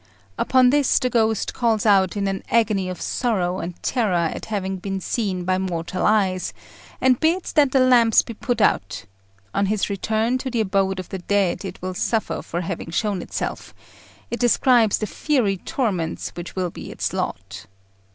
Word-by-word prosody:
Upon 255 - +4
this 290 -2 +3
the 250 - 0
ghost 220 -2 +1
calls 230 -3 +1
out 200 -1 +4
in 200 -1 0
an 195 0 -2
agony 210 -5 +2
of 180 - -6
sorrow 190 -7 -1
and 175 0 -5
terror 180 -10 +1
at - - -7
having 195 -3 -3
been 195 +1 -4
seen 190 -2 -2
by 185 0 +1
mortal 180 -1 -3
eyes, 190 -4 +1 0.5
and 255 -2 +3
bids 340 +3 0
that 290 -4 +4
the 265 - +4
lamps 240 -3 +5
be 230 - -7
put 245 +2 -2
out: 100 +1 +1 0.5
on 200 - +1
its 210 0 0
return 220 +5 0
to 260 - -4
the 235 -3 0
abode 195 -2 0
of 185 - -7
the 190 - -5
dead 195 0 0
it 190 -2 -7
will 185 0 -3
suffer 220 +3 -1
for 175 - -4
having 170 -1 -5
shown 200 +2 -1
itself: - - -5 0.6
it 235 - -3
describes 240 -2 +4
the 215 - -2
fiery 220 -4 0
torments 185 - -2
which 175 0 -8
will 180 -2 -1
be - - -9
its - - -3
lot. 95 0 -5
200 Hz, 180 wpm, -22 LUFS, 185-235 Hz, 0.6 s, lamps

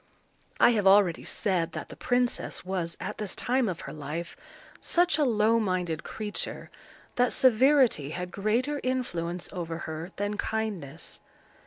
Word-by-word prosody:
I - - +7
have 210 -4 +2
already 195 -3 +5
said 175 -4 -1
that - - -6
the - - -9
princess 245 -6 -1
was, 180 -3 -3
at 210 - -5
this 210 -3 -3
time 250 -2 +1
of 175 - -4
her - - -7
life, 155 +3 -5 0.4
such 345 -3 +2
a - - +4
low 225 -2 +3
minded 180 -6 -1
creature, 210 -1 -4 0.5
that 245 0 +3
severity 255 - +4
had 180 +3 -5
greater 240 +8 0
influence 180 -9 -2
over 165 -3 -4
her 160 +2 -5
than 205 +1 -2
kindness. 195 -11 -4
205 Hz, 145 wpm, -28 LUFS, 170-245 Hz, 0.5 s, I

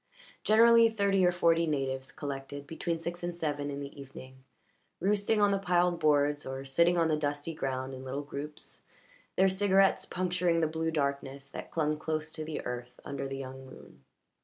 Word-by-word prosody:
Generally 230 +1 +6
thirty 200 -2 +3
or 180 - +5
forty 170 -1 +3
natives 135 -3 -2
collected 140 0 -6
between 165 +2 -3
six 170 +2 -5
and 175 0 -4
seven 145 -3 -2
in 140 0 -4
the 140 0 -8
evening, 130 -1 -12 0.6
roosting 205 +3 +1
on 205 -1 +4
the 195 - +1
piled 180 -2 +2
boards 145 -1 +3
or 135 +1 -6
sitting 170 +6 +3
on 165 -1 +3
the 155 - +2
dusty 145 +1 -2
ground 130 -3 -3
in 130 0 -8
little 135 +2 -4
groups, 145 +1 -8 0.5
their 190 - +5
cigarettes 195 0 +3
puncturing 180 -2 +1
the 165 - +3
blue 160 +1 -1
darkness 140 -2 -2
that - - -7
clung 155 -2 0
close 155 0 -3
to 155 - -5
the 155 0 -5
earth 125 0 -6
under 140 -1 -4
the 135 0 -5
young 130 0 -7
moon. 130 - -14
155 Hz, 180 wpm, -30 LUFS, 140-175 Hz, 0.6 s, Generally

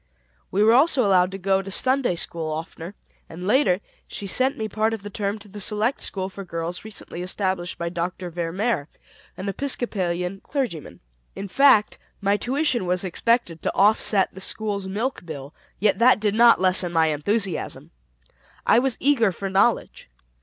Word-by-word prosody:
We 200 +2 +2
were 220 +1 +6
also 265 -1 +4
allowed 185 -2 +4
to 195 - -6
go 195 0 +1
to 195 - -8
Sunday 255 0 +1
school 165 -1 -3
oftener, 165 +4 -6 0.3
and 180 +3 -8
later, 210 -4 +3 0.3
she 205 - -5
sent 255 +7 +1
me 220 - -2
part 220 +1 0
of 205 - -12
the 205 - -7
term 200 +1 -2
to 210 0 -15
the 205 +1 -10
select 215 +6 0
school 190 -1 -2
for 195 +1 -8
girls 170 0 -5
recently 210 -5 -7
established 185 -1 -2
by 170 0 -3
Dr. 175 +1 -4
Ver 165 -1 -3
Mehr, 195 -5 -1 0.5
an 190 - -5
Episcopalian 195 -6 -2
clergyman. 245 - -4 0.3
In 200 - -5
fact, 240 -1 +4 0.2
my 200 0 +2
tuition 255 - 0
was 180 +2 +1
expected 190 -2 0
to - - -2
offset 205 -1 +3
the 190 - -10
school's 200 -1 -3
milk 220 +6 -3
bill, 145 -4 -8 0.3
yet 210 +1 +2
that 245 -1 +5
did 210 -1 +1
not 235 -1 +6
lessen 185 -1 +2
my 160 -2 +3
enthusiasm. 190 +5 -1 0.7
I 230 - +5
was 260 -2 0
eager 250 -7 +3
for 195 +2 -5
knowledge. 195 - +1
195 Hz, 170 wpm, -23 LUFS, 180-225 Hz, 0.7 s, were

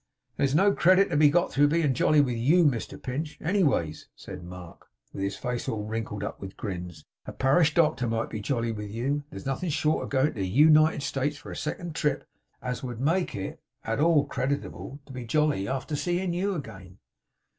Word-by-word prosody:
'There's 140 0 +1
no 200 +5 +5
credit 185 +2 +4
to - - 0
be 150 0 +6
got 175 +4 +2
through 145 +3 +4
being 150 -2 +2
jolly 150 +4 +4
with 125 -4 0
YOU, 155 +10 +4
Mr 125 -7 -1
Pinch, 150 +4 -4
anyways,' 155 - 0
said 90 -2 -9
Mark, 90 -1 -11 0.3
with - - -6
his 100 0 -2
face 125 +3 -3
all 105 -2 -2
wrinkled 110 -2 -4
up - - -5
with 95 0 -8
grins. 90 -4 -6 0.2
'A - - -6
parish 150 +3 +3
doctor 150 -7 +2
might 115 0 -2
be 110 - -4
jolly 115 +1 -1
with 105 -2 -6
you. 135 +7 -2
There's 95 - -9
nothing 135 +6 -2
short 155 +1 +1
of - - -9
goin' 135 0 +2
to 110 - -8
the 95 - -1
U 150 +11 +5
nited 155 -1 +4
States 140 +1 -1
for - - -10
a - - -6
second 170 +2 -4
trip, 150 -1 -1 0.4
as 125 -1 -3
would 120 -3 -6
make 170 +7 0
it 95 -1 -5 0.2
at 115 +2 -2
all 155 -2 +4
creditable 140 +1 -3
to 135 - -12
be 125 -1 -6
jolly, 140 -4 +1
arter 135 +4 -3
seein' 175 +3 -1
you 195 +3 -1
again! 95 - -9
135 Hz, 205 wpm, -27 LUFS, 110-155 Hz, 0.4 s, be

